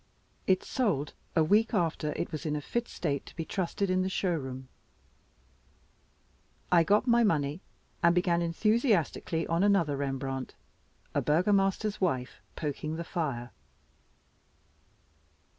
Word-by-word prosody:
It 185 -1 +3
sold 185 - -1 0.2
a 160 - +5
week 215 +7 +3
after 165 -4 0
it - - -3
was 155 -1 -4
in 150 - 0
a - - -1
fit 235 +10 -2
state 140 -5 -2
to - - -12
be 165 - -4
trusted 190 +2 -1
in 185 0 +2
the 185 - 0
showroom. 135 -9 -2 2.0
I 170 -2 +6
got 205 +7 +3
my 235 -1 +4
money, 150 -4 +1 0.4
and 170 0 +4
began 175 -1 +2
enthusiastically 175 - +1
on 165 +1 0
another 195 -8 +3
Rembrandt 135 -1 -3 0.6
"A - - +1
Burgomaster's 195 +6 +2
Wife 130 -9 -1
Poking 155 +1 -3
the 170 - -4
Fire." 135 -9 -3
170 Hz, 125 wpm, -30 LUFS, 150-195 Hz, 2.0 s, I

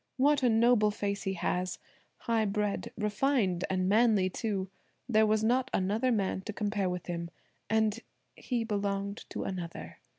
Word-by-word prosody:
What 285 +2 +4
a 250 - +4
noble 225 -1 +4
face 200 -1 -2
he 195 - 0
has! 180 0 -1 0.4
high 225 -2 +1
bred, 210 0 -1
refined, 210 -3 +1
and 185 -1 0
manly, 210 -3 +4
too! 195 -3 -3 0.4
There 220 -3 +4
was 215 0 +2
not 250 +3 +2
another 215 +7 +1
man 195 -4 0
to 215 - -3
compare 205 -2 -1
with 180 0 -4
him; 170 -1 -4 0.4
and–he 220 +2 -2
belonged 200 -1 -2
to - - -4
another. 175 -3 -6
210 Hz, 145 wpm, -30 LUFS, 190-225 Hz, 0.4 s, What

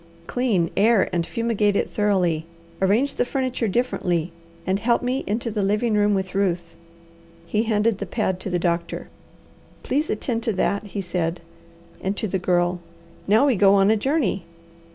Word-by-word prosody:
Clean, 210 -10 0
air, 220 0 +4
and 170 -1 0
fumigate 225 -4 0
it - - 0
thoroughly. 180 -6 +1 0.3
Arrange 220 +9 +2
the - - +1
furniture 255 -2 -1
differently, 180 -7 0 0.3
and 190 +1 0
help 235 +2 +1
me 255 +2 -1
into 230 +3 -1
the 210 -1 -1
living 210 +3 +1
room 205 -1 +3
with 190 -1 -3
Ruth." 180 -4 -1 0.7
He 210 +6 0
handed 215 -1 +1
the - - -4
pad 190 -5 -1
to 195 - -5
the 180 - 0
doctor. 170 -1 -2 0.7
"Please 295 +4 0
attend 230 +2 -1
to 225 -1 -1
that," 200 +2 0
he 200 0 -4
said, 175 -2 -2 0.6
and 195 +2 -2
to 215 - -2
the 190 0 -1
Girl: 175 0 +1 0.5
"Now 215 +7 +5
we 270 -4 +3
go 195 0 +5
on 195 +1 +4
a - - +4
journey. 225 - 0
205 Hz, 170 wpm, -23 LUFS, 180-230 Hz, 0.7 s, Now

